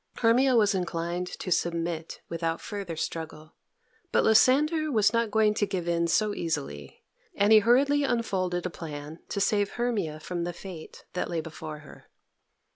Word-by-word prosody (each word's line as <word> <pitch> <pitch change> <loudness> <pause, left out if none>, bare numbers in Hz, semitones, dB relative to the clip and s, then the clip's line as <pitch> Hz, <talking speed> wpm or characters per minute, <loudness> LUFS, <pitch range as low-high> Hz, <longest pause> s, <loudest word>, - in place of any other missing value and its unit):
Hermia 250 +3 +4
was 210 -3 +4
inclined 175 -1 -2
to 185 - -6
submit 170 -1 -1
without 165 0 -2
further 200 -5 -5
struggle, 160 -1 -5 0.6
but - - +3
Lysander 300 +8 +4
was 215 -3 +3
not 230 -1 +1
going 215 0 +3
to 205 -1 0
give 180 -3 -3
in 170 0 +1
so 210 +5 +2
easily, 70 - -4 0.3
and 205 +2 +4
he 215 - +9
hurriedly 275 +6 +3
unfolded 185 -9 -1
a 180 - -2
plan 150 -1 -8
to - - -2
save 205 0 +1
Hermia 205 -11 -2
from 175 +2 -4
the 175 0 -3
fate 175 -2 -10
that 180 - -2
lay 170 - -1
before 155 -1 -7
her. 150 - -15
180 Hz, 160 wpm, -27 LUFS, 165-220 Hz, 0.6 s, he